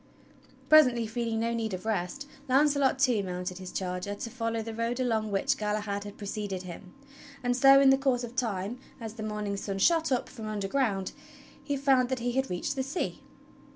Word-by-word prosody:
Presently, 250 Hz, -7 st, +6 dB
feeling 225 Hz, 0 st, -2 dB
no 230 Hz, +1 st, 0 dB
need 220 Hz, -4 st, -2 dB
of 185 Hz, -, -9 dB
rest, 220 Hz, +6 st, -2 dB, 0.2 s
Launcelot 280 Hz, 0 st, +3 dB
too 255 Hz, -6 st, +3 dB
mounted 180 Hz, -1 st, -4 dB
his 185 Hz, -1 st, -7 dB
charger 180 Hz, +2 st, -3 dB
to 230 Hz, -, -5 dB
follow 230 Hz, -2 st, -2 dB
the 225 Hz, 0 st, -6 dB
road 230 Hz, +2 st, -2 dB
along 225 Hz, -4 st, 0 dB
which 265 Hz, +7 st, 0 dB
Galahad 210 Hz, -1 st, -2 dB
had 205 Hz, -, -9 dB
preceded 205 Hz, -2 st, -4 dB
him; 180 Hz, 0 st, -10 dB, 0.5 s
and 245 Hz, 0 st, +1 dB
so, 270 Hz, +1 st, +7 dB
in 275 Hz, -1 st, +7 dB
the 270 Hz, -, +4 dB
course 260 Hz, -3 st, +1 dB
of 240 Hz, 0 st, -7 dB
time, 220 Hz, -1 st, -2 dB, 0.2 s
as 225 Hz, -2 st, -6 dB
the 225 Hz, -, -8 dB
morning 210 Hz, -1 st, -3 dB
sun 195 Hz, 0 st, -4 dB
shot 320 Hz, -, +3 dB
up 255 Hz, -, +1 dB
from 225 Hz, -5 st, -8 dB
un 215 Hz, -1 st, -3 dB
derground, 200 Hz, -2 st, 0 dB, 0.5 s
he 285 Hz, -1 st, -1 dB
found 265 Hz, -2 st, +3 dB
that 260 Hz, -, 0 dB
he 245 Hz, 0 st, -1 dB
had 265 Hz, +2 st, 0 dB
reached 180 Hz, +11 st, -2 dB
the 265 Hz, -, -1 dB
sea. 275 Hz, +6 st, -3 dB
230 Hz, 195 wpm, -29 LUFS, 205-260 Hz, 0.5 s, so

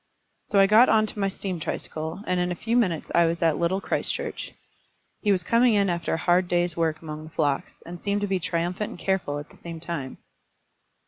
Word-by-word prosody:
So 200 Hz, -, +2 dB
I 195 Hz, -, +8 dB
got 220 Hz, +5 st, +6 dB
on 215 Hz, -1 st, +4 dB
to 215 Hz, -, -7 dB
my 195 Hz, -1 st, +1 dB
steam 190 Hz, -2 st, -4 dB
tricycle, 160 Hz, +3 st, -4 dB
and 180 Hz, 0 st, 0 dB
in 180 Hz, 0 st, 0 dB
a -, -, -2 dB
few 225 Hz, +7 st, -2 dB
minutes 185 Hz, -10 st, +1 dB
I 170 Hz, -1 st, +5 dB
was 170 Hz, +1 st, -1 dB
at 160 Hz, -2 st, +2 dB
Little 170 Hz, +3 st, +1 dB
Christchurch. -, -, -3 dB, 0.7 s
He 210 Hz, -, +2 dB
was 185 Hz, -3 st, +2 dB
coming 230 Hz, +3 st, +4 dB
in 200 Hz, -2 st, +3 dB
after 170 Hz, -1 st, -1 dB
a -, -, -2 dB
hard 175 Hz, +2 st, +2 dB
day's 175 Hz, -1 st, +1 dB
work 160 Hz, -1 st, -1 dB
among 155 Hz, 0 st, -6 dB
the -, -, -10 dB
flocks, 145 Hz, -3 st, -2 dB
and 175 Hz, 0 st, -8 dB
seemed 205 Hz, 0 st, 0 dB
to 205 Hz, -, 0 dB
be 190 Hz, -1 st, 0 dB
triumphant 175 Hz, +4 st, -2 dB
and -, -, -9 dB
careful 180 Hz, -6 st, -1 dB
at 145 Hz, +1 st, -8 dB
the -, -, -17 dB
same 170 Hz, -1 st, -8 dB
time. 160 Hz, -5 st, -5 dB
175 Hz, 220 wpm, -25 LUFS, 165-200 Hz, 0.7 s, I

